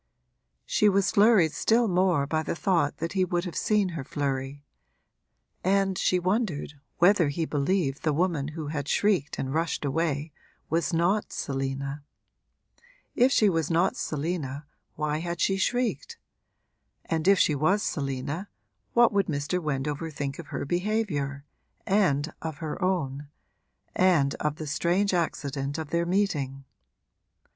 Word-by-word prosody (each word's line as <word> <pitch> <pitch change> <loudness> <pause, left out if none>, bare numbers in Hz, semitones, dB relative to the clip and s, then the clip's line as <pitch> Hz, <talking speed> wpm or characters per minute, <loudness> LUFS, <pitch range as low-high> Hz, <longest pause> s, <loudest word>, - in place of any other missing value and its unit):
She 210 - +3
was 195 -1 +2
flurried 205 -6 +5
still 225 +9 +2
more 180 -6 +2
by 155 +2 0
the 160 - -3
thought 165 -5 +1
that 165 +2 -4
he 190 -2 +2
would 175 0 -1
have 175 - -6
seen 210 -3 +2
her 165 -5 -5
flurry, 140 0 -3 1.0
and 195 0 +2
she 185 - +2
wondered 185 -5 -1 0.2
whether 175 -3 +4
he 160 +3 -1
believed 145 -1 0
the 155 - +1
woman 160 -2 0
who 155 -2 -4
had 145 -2 -3
shrieked 190 -8 +1
and 130 0 -3
rushed 165 -1 -1
away 150 +1 -1 0.4
was 165 -3 +1
not 175 +6 +1
Selina. 135 +1 -3 1.1
If 255 +2 +4
she 215 - +4
was 165 -5 +1
not 170 +3 +2
Selina 150 -2 -3 0.3
why 150 0 -1
had 170 0 -4
she 195 - +2
shrieked? 245 +5 -1 0.9
and 165 +1 -1
if 195 0 +6
she 155 - +3
was 185 +9 +2
Selina 140 +6 -3 0.4
what 235 -2 +5
would 200 -2 +2
Mr. 150 +4 -1
Wendover 150 +1 -2
think 140 -1 -4
of 165 - -8
her - - -4
behaviour, 175 -6 -1 0.4
and 170 -7 +2
of 160 -2 -5
her 160 +3 -5
own, 150 -7 -1 0.7
and 165 -7 +3
of 150 -1 -1
the 155 - -6
strange 175 +7 +1
accident 145 -4 -2
of 160 -2 -5
their 170 0 +1
meeting? 145 -9 -1
165 Hz, 145 wpm, -27 LUFS, 145-185 Hz, 1.1 s, if